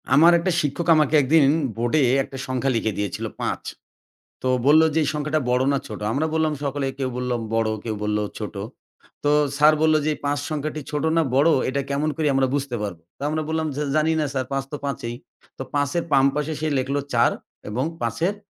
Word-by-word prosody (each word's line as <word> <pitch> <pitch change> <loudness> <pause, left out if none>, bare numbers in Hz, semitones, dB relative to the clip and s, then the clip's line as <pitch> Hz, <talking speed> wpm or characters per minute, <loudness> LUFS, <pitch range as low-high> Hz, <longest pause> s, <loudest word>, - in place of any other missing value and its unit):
আমার 160 +5 +7
একটা 185 +2 0
শিক্ষক 150 +4 -2
আমাকে 155 0 +3
একদিন 150 +3 +4 0.3
বোর্ডে 120 +6 +1 0.2
একটা 135 - -9
সংখ্যা 130 +1 0
লিখে 110 -2 -1
দিয়েছিল 100 -2 -3 0.2
৫, - - -2 0.8
তো - - -2 0.2
বলল 150 +3 +7
যে, 160 - +2
"এই 145 - 0
সংখ্যাটা 150 +1 -1
বড় 125 +1 +2
না - - +2
ছোট?" 105 - -7
আমরা 145 +6 0
বললাম, 160 -1 +1
সকলে 140 0 -2
কেউ 130 -1 -1
বলল 125 0 -2 0.2
বড়, 115 -1 +1
কেউ 110 -2 -3
বলল 105 0 0 0.2
ছোট। 105 -2 -6 0.7
তো 145 - +2 0.3
স্যার 150 +1 +6
বলল 155 0 +4
যে, - - +2
"এই - - -18
৫ 145 0 0
সংখ্যাটি 155 0 -3
ছোট 150 -1 -2
না - - +5
বড়, 145 +5 +5 0.2
এটা 140 +1 -1
কেমন 145 +2 0
করে 155 -2 0
আমরা 135 0 +3
বুঝতে 140 -3 -2
পারবো?" 90 -5 -5 0.2
তো - - -20
আমরা 155 +1 -1
বললাম 160 0 -1
যে, 145 - -2
"জানি 155 +1 +3
না 155 - +1
স্যার, 130 -1 -1
৫ 135 0 0
তো 145 - -3
৫ই।" 120 -4 -4 0.4
তো - - -4
৫ 145 -1 +1
এর - - -3
বাম 135 -1 +5
পাশে 150 +1 -1
সে 155 - -1
লিখল 135 +2 -2 0.2
৪ 120 0 +4 0.4
এবং 120 +5 -1 0.2
৫ 115 -1 -2
এর 200 - -2
140 Hz, 210 wpm, -23 LUFS, 125-155 Hz, 0.8 s, আমার